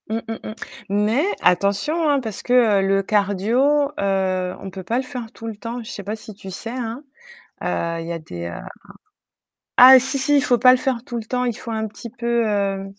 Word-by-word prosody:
Mmh, 220 - -1
mmh, 225 - -3 0.2
mmh, - - -6 0.4
mais 210 +7 +2 0.2
attention, 200 - +2
hein, 285 -1 +3
parce 220 -6 -6
que 235 -5 +3
le 195 0 +2
cardio, 225 +9 +2
heu, 190 -2 0
on 195 - -7
peut 190 0 -8
pas 225 +6 -1
le 260 - 0
faire 250 -4 -7
tout 225 - -9
le 225 - -5
temps. 230 +3 -6
Je 220 - -9
sais 200 - -7
pas 210 +3 -4
si 215 0 -11
tu 195 -1 -11
sais? 225 +5 -6
Hein. 245 +1 -5 0.6
Heu, 170 0 -2
il 165 - -7
y - - -4
a 165 - -4
des, 85 - -8
heu 85 - -6 1.2
ah 260 +1 +10
si 265 +2 -3
si, 285 +2 +2
il - - +4
faut 245 -3 +2
pas 255 +2 +7
le 255 - +5
faire 255 -3 -2
tout 240 -2 -6
le 225 - -5
temps, 250 +2 -1
il 245 -1 0
faut - - -9
un 220 0 -2
petit 225 +2 -10
peu, 235 -1 -1
heu, 200 -2 -1
225 Hz, 225 wpm, -21 LUFS, 195-250 Hz, 1.2 s, ah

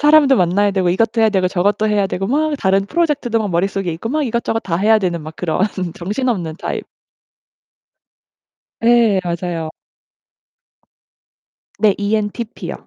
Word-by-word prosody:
사람도 295 -3 +5
만나야 190 +3 +2
되고 190 -2 0
이것도 225 +5 +1
해야 220 - +5
되고 190 -3 +1
저것도 200 +4 +1
해야 205 -2 +2
되고 195 0 -3
막 305 +5 +1
다른 195 +1 +1
프로젝트도 290 -7 0
막 210 -3 -2
머릿속에 185 0 -1
있고 170 +8 -5
막 305 +4 0
이것저것 235 -2 -1
다 170 -6 -2
해야 215 +3 +4
되는 175 -4 -2
막 155 +1 -9
그런 165 -2 -2 0.3
정신없는 190 -4 -2
타입. - - -4 2.0
예. 230 -4 +4
맞아요. 170 -2 -3 2.1
네. 210 -3 +3
ENTP요. 210 +2 -3
205 Hz, 310 characters per minute, -18 LUFS, 180-230 Hz, 2.1 s, 사람도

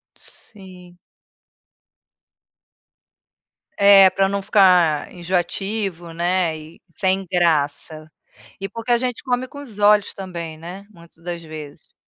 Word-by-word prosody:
Sim. 180 -3 -16 2.8
É, 200 -1 +7
para 195 +1 +1
não 200 0 -2
ficar 180 -7 +3
enjoativo, 180 0 -3
né, 175 -1 0
e 155 +1 -14
sem 190 0 0
graça. 155 -2 0 0.5
E 195 - -5
porque 230 +1 -5
a 240 - +5
gente 250 -1 -3
come 255 0 -1
com 285 +2 -10
os 220 -7 -10
olhos 205 -1 +4
também, 170 -4 -7
né, 180 +5 -10
muitas 170 -2 -19
das 175 -1 -5
vezes. 155 -2 -11
185 Hz, 115 wpm, -21 LUFS, 170-200 Hz, 2.8 s, É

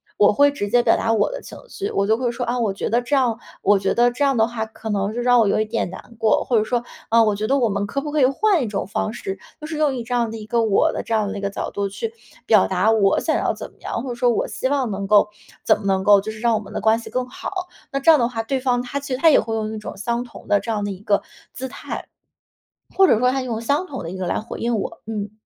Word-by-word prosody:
我 205 - +5
会 285 +7 +5
直 205 -8 -4
接 245 +3 +4
表 - - +4
达 225 - 0
我 220 - +2
的 - - -6
情 - - -11
绪， 405 -1 -4
我 200 0 0
就 220 - +4
会 245 -1 -1
说： 240 +1 -3
“啊， 245 +1 0
我 220 -5 0
觉 - - -3
得 235 +2 +2
这 280 +4 0
样， 240 -4 +1 0.2
我 205 +1 +4
觉 195 0 0
得 240 +1 +3
这 285 +4 -2
样 275 -3 +2
的 220 - +4
话 230 -2 -3
可 220 0 -9
能 200 +1 -1
就 240 - -4
让 245 0 +4
我 220 - +3
有 - - +2
一 215 - +1
点 220 -3 -2
难 230 +5 -11
过“， 220 -1 +2
或 240 - +3
者 215 - +3
说： 240 +2 -1 0.2
“啊， 230 +1 +5
我 215 -2 +3
觉 210 +2 -2
得 275 +3 +2
我 240 - +3
们 200 -1 -1
可 275 +7 -3
不 295 +1 -5
可 305 - +2
以 - - +7
换 345 +5 +2
一 - - -2
种 205 -2 -3
方 215 +1 -2
式”， 195 -4 -5 0.2
就 305 - -7
是 315 -1 -5
用 300 -3 +2
一 240 -3 -5
这 245 +1 -2
样 235 -2 0
的 225 - -6
一 215 - -8
个 230 +1 +1
我 215 -3 +2
的 - - -3
这 230 - -4
样 215 -2 +2
的 200 - -5
一 - - -5
个 200 - -1
角 - - -4
度 200 -1 -2
去 450 - -5 0.3
表 215 -4 +5
达 190 +4 +2
我 200 -3 +3
想 - - 0
要 - - 0
怎 - - -8
么 - - -28
样， 230 - -4
或 - - -6
者 240 - -4
说 245 0 +2
我 235 - 0
希 260 - -2
望 270 -4 0
能 195 -1 -3
够， 205 +1 +5 0.4
怎 - - +4
么 210 - -11
能 190 -1 +2
够 205 -1 +7
就 220 - -5
是 215 - -10
让 235 0 +2
我 215 - -1
们 200 - -12
的 - - -3
关 220 +2 +3
系 230 - -9
更 255 0 -2
好。 - - -7 0.4
那 275 - -1
这 275 - +3
样 320 - +8
的 235 - +2
话， 230 -2 -3
对 260 +3 -2
方 245 -2 +1
他 265 +3 -4
其 280 -2 -5
实 255 - -2
他 325 - +6
也 305 - +6
会 225 +1 -4
用 220 0 -2
一 - - -4
种 210 - -7
相 235 +4 -2
同 245 - -13
的 205 -1 +3
这 230 - -4
样 210 -2 -1
的 205 - -2
一 190 0 -8
个 205 -1 +2 0.3
姿 265 - -6
态， 260 - -7 0.9
或 385 0 +6
者 - - +4
说 250 +1 +3
他 265 +1 -1
用 240 -3 -3
相 285 +9 0
同 265 - -6
的 165 - -5
一 190 - -6
个 185 - -2
来 - - 0
回 225 - -8
应 235 -1 0
我。 195 - -5
嗯。 210 -2 -4
230 Hz, 340 characters per minute, -21 LUFS, 210-255 Hz, 0.9 s, 样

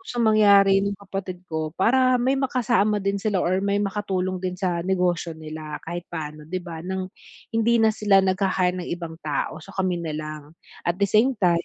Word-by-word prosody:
gustong 240 -11 -2
mangyari 200 -2 +6
ng 200 - -1
kapatid 190 -2 -6
ko 155 -1 -3
para 255 +5 +4
may 265 +2 +2
makasama 240 -5 +1
din 200 0 0
sila 200 -3 0
or 185 +2 +1
may 200 0 +1
makatulong 190 -2 -2
din 185 -1 -3
sa 175 -3 0
negosyo 180 -3 0
nila 155 -1 -7
kahit 175 +1 -4
paano, 150 -2 -6
'di 185 +1 -3
ba, 165 -2 -7
nang 185 0 -3 0.4
hindi 225 +1 +3
na 220 - +5
sila 205 -2 +4
nagha-hire 185 -1 +1
ng - - -8
ibang 170 -2 -6
tao, 150 +1 -2
so 195 - -13
kami 185 -2 0
na 160 -2 -4
lang. 155 -1 -6 0.4
At 175 +3 -1
the 200 - +3
same 230 +7 +4
time, 170 -2 +3
190 Hz, 190 wpm, -24 LUFS, 170-205 Hz, 0.4 s, mangyari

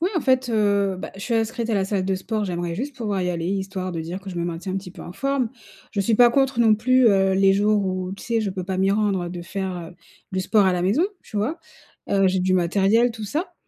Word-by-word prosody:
Ouais, 360 +4 +1
en - - +2
fait, 260 -2 +2
heu, 200 -3 +2
bah, - - -6
je 195 - -10
suis 230 +3 -2
inscrite 230 +1 -1
à 220 - +1
la 195 -1 +1
salle 195 -1 -1
de 190 - 0
sport. 210 +3 -2
J'aimerais 175 -2 -3
juste 270 +6 -5
pouvoir 205 -5 -2
y 180 - 0
aller, 170 -1 -3
histoire 190 -1 -3
de 165 - -3
dire 170 +4 -5
que 195 - -10
je 180 - -6
me 170 - -1
maintiens 175 +2 -4
un - - -1
petit 190 -2 -6
peu - - -11
en 175 - -9
forme. 270 +2 -1 0.4
Je 200 - 0
suis 220 +3 +2
pas 240 +2 +6
contre 270 -1 +1
non 220 -2 +6
plus, 255 +3 +3
heu, 195 -2 +3
les 195 0 +4
jours 205 +1 +2
où, 185 0 -3
tu 200 - -9
sais? 230 -1 0
Je 205 - -1
peux 185 -1 -5
pas 190 0 -3
m'y 190 +1 +2
rendre, 200 -3 +1
heu, 175 - -6
de 175 -1 -6
faire, 190 +1 -4 0.2
heu, - - -23 0.4
du 185 - 0
sport 205 +1 +3
à 185 - +3
la 175 - -1
maison, 215 - +2 0.2
tu 210 - -9
vois? 260 +12 -1 0.5
Heu, 195 -1 +3
j'ai 185 0 0
du 185 0 +1
matériel, 195 +7 +3
tout 220 -2 -7
ça, 310 - -3
195 Hz, 280 wpm, -23 LUFS, 185-225 Hz, 0.5 s, pas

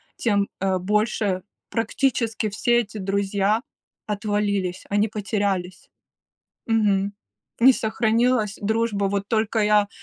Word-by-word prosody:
тем, 200 -3 +1
э, 190 -1 +1
больше 205 -1 0 0.3
практически 225 -1 0
все 240 +4 +2
эти 220 -2 -4
друзья 200 +2 0 0.5
отвалились, 205 -3 -1
они 205 +2 +2
потерялись. 200 -3 -2 0.8
Мгм. 205 -3 +2 0.5
Не 260 +3 +8
сохранилась 225 -1 +1
дружба, 220 -1 0
вот 200 0 -1
только 220 0 0
я 210 -1 +3
210 Hz, 100 wpm, -23 LUFS, 200-225 Hz, 0.8 s, Не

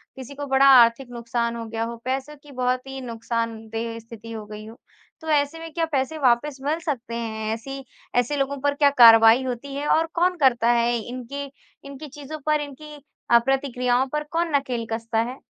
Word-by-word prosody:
किसी 260 +1 -9
को 285 +1 -5
बड़ा 270 0 +4
आर्थिक 245 -1 +6
नुकसान 235 0 -2
हो 230 -1 -5
गया 225 0 -3
हो, 235 +1 -4
पैसों 265 +3 -3
की 295 - -14
बहुत 255 0 -1
ही 270 0 -7
नुकसानदेह 230 -1 -4
स्थिति 230 0 -11
हो 220 -2 -6
गई 210 0 -9
हो 225 +2 -12 0.4
तो 320 - -10
ऐसे 290 +2 +1
में 330 0 -8
क्या 330 0 0
पैसे 280 +2 -1
वापस 265 +2 +2
मिल 305 +4 0
सकते 265 -8 -4
हैं? 220 -1 -3
ऐसी 270 +4 -7 0.3
ऐसे 245 +4 +1
लोगों 275 0 -1
पर 285 0 +1
क्या 285 -1 +4
कार्रवाई 225 +1 +8
होती 260 +2 -5
है? 290 +1 -3
और 320 +2 +3
कौन 355 +1 +1
करता 240 -5 +3
है 240 0 +2
इनके 250 +4 -6 0.4
इनकी 280 +2 -9
चीज़ों 295 +2 -9
पर, 305 -1 +2
इनकी 295 +1 -9 0.4
अ, 235 - +8
प्रतिक्रियाओं 260 -1 +1
पर 300 0 -1
कौन 330 -2 0
नकेल 255 -4 -1
कसता 225 0 -2
है? 260 - -11
255 Hz, 195 wpm, -23 LUFS, 230-285 Hz, 0.4 s, कार्रवाई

